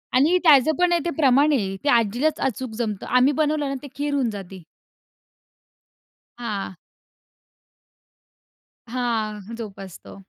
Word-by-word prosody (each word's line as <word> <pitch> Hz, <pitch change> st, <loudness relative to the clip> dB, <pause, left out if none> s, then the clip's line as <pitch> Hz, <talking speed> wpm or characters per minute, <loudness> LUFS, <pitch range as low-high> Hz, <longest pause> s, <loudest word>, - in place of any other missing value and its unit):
आणि 310 Hz, +8 st, +4 dB
त्याचं 300 Hz, -2 st, +6 dB
पण 360 Hz, -1 st, +3 dB
आहे 345 Hz, -, +3 dB
ते -, -, 0 dB
प्रमाण 285 Hz, +1 st, +4 dB
आहे. 195 Hz, -7 st, -1 dB
ते 290 Hz, -, +1 dB
आजीलाच 240 Hz, +6 st, +2 dB
अचूक 255 Hz, -1 st, -5 dB
जमतं. 215 Hz, -5 st, -3 dB
आम्ही 250 Hz, +3 st, +3 dB
बनवलं 300 Hz, -1 st, 0 dB
ना 275 Hz, -, -3 dB
ते -, -, -7 dB
खीर 290 Hz, 0 st, -2 dB
होऊन 265 Hz, -5 st, +1 dB
जाते. 195 Hz, -3 st, -8 dB, 1.8 s
हां. 205 Hz, -6 st, -5 dB, 2.1 s
हां, 225 Hz, -4 st, -2 dB, 0.2 s
जोपासतो. 195 Hz, -5 st, -10 dB
250 Hz, 120 wpm, -23 LUFS, 210-290 Hz, 2.1 s, त्याचं